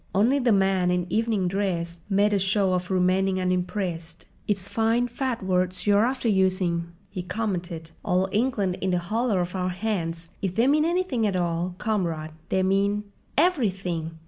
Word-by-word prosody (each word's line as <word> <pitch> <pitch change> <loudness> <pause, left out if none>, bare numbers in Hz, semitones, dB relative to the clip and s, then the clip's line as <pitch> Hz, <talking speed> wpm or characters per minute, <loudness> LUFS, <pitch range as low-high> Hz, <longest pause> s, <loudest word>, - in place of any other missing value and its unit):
Only 235 +8 +4
the 245 -3 +2
man 190 -2 +3
in 180 -1 +1
evening 220 -4 +1
dress 175 -3 -2
made 205 +1 +3
a 200 - +3
show 190 0 +2
of 180 0 -1
remaining 185 +1 +2
unimpressed. 180 -2 -2 0.2
"It's 200 -2 0
fine, 230 +2 +1
fat 245 -2 -3
words 185 -1 0
you're 205 +1 +4
after 255 -2 -2
using," 185 -4 +1 0.2
he 190 -3 -4
commented. 180 -4 -4
"'All 185 +1 +1
England 205 -4 0
in 190 - 0
the 180 - +2
hollow 215 +5 0
of 180 +1 -2
our 185 -1 0
hands!' 175 -4 -3
If 185 -2 -2
they 230 - +3
mean 300 +3 +4
anything 340 -10 +1
at 195 - -1
all, 175 0 -1
comrade, 170 -8 -2 0.2
they 190 - +2
mean—" 200 +2 +1 0.3
"Everything!" 185 - 0
190 Hz, 165 wpm, -25 LUFS, 180-215 Hz, 0.3 s, Only